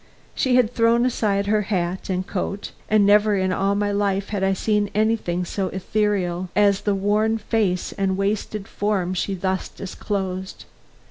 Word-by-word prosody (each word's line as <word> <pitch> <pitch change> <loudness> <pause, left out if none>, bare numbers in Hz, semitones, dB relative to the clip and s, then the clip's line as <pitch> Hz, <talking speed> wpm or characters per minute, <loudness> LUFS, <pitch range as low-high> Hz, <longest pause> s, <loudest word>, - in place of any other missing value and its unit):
She 255 -2 +1
had 245 -2 +3
thrown 230 +1 +3
aside 205 -5 0
her 210 +1 +2
hat 190 -3 -2
and 185 0 -1
coat, 195 +1 -4 0.2
and 215 -1 +4
never 210 +1 +5
in 185 -1 +1
all 195 +2 +1
my 205 0 0
life 200 -1 0
had 200 -2 -2
I 195 0 +3
seen 210 +1 0
anything 210 -5 +1
so 190 +2 -2
ethereal 190 -2 -1
as 200 -1 +3
the 205 -1 0
worn 210 +3 +1
face 210 -4 -1
and 195 -2 -1
wasted 200 0 -2
form 200 -3 -1
she 190 +1 -1
thus 190 0 -2
disclosed. 190 -1 -5
200 Hz, 160 wpm, -22 LUFS, 190-210 Hz, 0.2 s, never